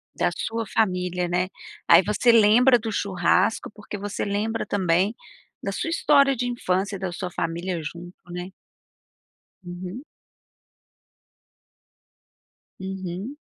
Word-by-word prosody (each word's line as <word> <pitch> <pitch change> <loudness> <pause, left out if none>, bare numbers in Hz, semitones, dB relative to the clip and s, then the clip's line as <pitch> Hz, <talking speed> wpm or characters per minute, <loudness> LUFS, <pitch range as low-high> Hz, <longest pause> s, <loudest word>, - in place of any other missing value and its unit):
Da - - +1
sua 225 0 -3
família, 180 -4 0
né. 180 +1 0 0.4
Aí - - +8
você 210 +4 +3
lembra 235 +3 +6
do 225 0 -4
churrasco 195 0 +1
porque 210 -1 -8
você 205 0 -4
lembra 210 +3 -1
também 190 +2 +1 0.5
da 200 - -3
sua 200 - -3
história 280 -4 +4
de 245 0 -2
infância 200 -4 -1
e - - -7
da 190 -1 -3
sua 180 +1 -5
família 170 +1 -3
junto, 175 +4 -8 0.2
né. 180 +1 -5 1.2
Uhum. 180 +7 -7 2.8
Uhum. 190 +5 -5
195 Hz, 115 wpm, -24 LUFS, 180-225 Hz, 2.8 s, Aí